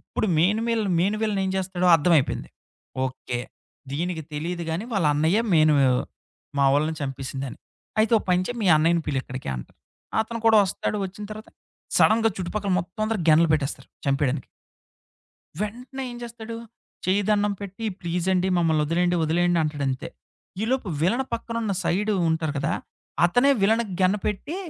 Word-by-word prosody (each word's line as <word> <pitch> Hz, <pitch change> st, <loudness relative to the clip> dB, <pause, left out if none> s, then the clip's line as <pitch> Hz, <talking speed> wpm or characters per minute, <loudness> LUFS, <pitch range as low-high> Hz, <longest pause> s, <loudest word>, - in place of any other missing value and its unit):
ఇప్పుడు -, -, -3 dB
main 195 Hz, +7 st, +3 dB
వీల 230 Hz, -2 st, +1 dB, 0.2 s
main 200 Hz, +4 st, +1 dB
villain 210 Hz, -3 st, 0 dB
ఏం 190 Hz, -, -1 dB
చేస్తాడో 185 Hz, -1 st, -1 dB
అర్థమైపోయింది. 160 Hz, -3 st, +1 dB, 0.5 s
ఓకే. 130 Hz, -1 st, -4 dB, 0.5 s
దీనికి 165 Hz, +2 st, -2 dB
తెలీదు 170 Hz, +4 st, -3 dB
గానీ, 165 Hz, +6 st, -2 dB
వాళ్ళ 190 Hz, -7 st, +2 dB
అన్నయ్యే 160 Hz, +8 st, +3 dB
మెయిన్ 155 Hz, -1 st, +5 dB
వి 135 Hz, -, +5 dB, 0.7 s
మావళని 145 Hz, +3 st, +3 dB
చంపేసిందాని. 135 Hz, -1 st, -5 dB, 0.4 s
"అయితే 220 Hz, +1 st, +2 dB
ఒక -, -, -8 dB
పనిచేయి 185 Hz, +7 st, +1 dB
మీ -, -, +1 dB
అన్నయ్యని 165 Hz, +2 st, +2 dB
పిలు 140 Hz, -2 st, 0 dB
ఇక్కడికి" 130 Hz, -, -7 dB
అంటారు. -, -, -10 dB, 0.4 s
అతను 230 Hz, +1 st, -6 dB
కూడా 225 Hz, -1 st, +7 dB
వస్తాడు, 190 Hz, -, -2 dB
వచ్చిన 200 Hz, +3 st, -9 dB
తర్వాత, 215 Hz, +1 st, -10 dB, 0.5 s
సడెన్‌గా 225 Hz, +1 st, +4 dB
చుట్టుపక్కల 195 Hz, +2 st, -2 dB
మొత్తం 180 Hz, +4 st, -6 dB
అందరూ 220 Hz, -3 st, -1 dB
గన్లు 160 Hz, +1 st, +6 dB
పెట్టేస్తారు 140 Hz, -3 st, -2 dB, 0.2 s
చంపేయడానికి. 140 Hz, -1 st, 0 dB, 1.2 s
వెంటనే 250 Hz, +5 st, -5 dB
ఏం -, -, -8 dB
చేస్తాడు? 230 Hz, -1 st, -7 dB, 0.5 s
చేయ్యిదన్నం 205 Hz, +2 st, +2 dB
పెట్టి 200 Hz, +3 st, -6 dB
"ప్లీజ్ 175 Hz, 0 st, -2 dB
అండి, 185 Hz, +1 st, +1 dB
మమ్మల్ని 160 Hz, -3 st, +2 dB
వదిలేయండి 175 Hz, +3 st, +1 dB
వదిలేయండి" 175 Hz, +2 st, +2 dB
అంటాడు 150 Hz, -2 st, -2 dB
అంతే. 130 Hz, -1 st, -3 dB, 0.5 s
ఈలోపు 245 Hz, -1 st, 0 dB
విలన్ 235 Hz, +11 st, +2 dB
పక్కన 230 Hz, 0 st, -4 dB
ఉన్న 205 Hz, -3 st, 0 dB
సైడ్ 210 Hz, +4 st, +1 dB, 0.2 s
ఉంటారు 160 Hz, -2 st, 0 dB
కదా! 140 Hz, -, 0 dB, 0.5 s
అతనే 245 Hz, +10 st, +3 dB
వీలనికి 220 Hz, -1 st, +2 dB
గన్నుపెట్టి, 205 Hz, -, 0 dB
180 Hz, 145 wpm, -25 LUFS, 155-215 Hz, 1.2 s, కూడా